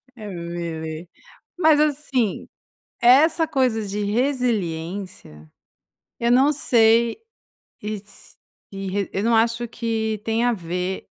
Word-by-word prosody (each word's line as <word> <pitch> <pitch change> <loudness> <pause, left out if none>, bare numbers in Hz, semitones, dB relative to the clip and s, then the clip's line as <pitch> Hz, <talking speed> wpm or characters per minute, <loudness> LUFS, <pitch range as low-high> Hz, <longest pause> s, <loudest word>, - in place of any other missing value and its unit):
Emily. 170 -5 -6 0.5
Mas 315 -4 +4
assim, 275 -7 0 0.5
essa 315 +7 +5
coisa 250 -7 0
de 205 +1 -3
resiliência, 195 - -2 0.7
eu 235 0 +1
não 270 +4 +5
sei 230 -4 +3 0.7
e 215 +1 -3
s 200 0 -11 0.8
eu 195 - -2
não 230 0 +3
acho 230 +1 +1
que 220 -2 -2
tem 225 +1 0
a 245 - +3
ver 180 0 -4
225 Hz, 100 wpm, -22 LUFS, 185-245 Hz, 0.8 s, essa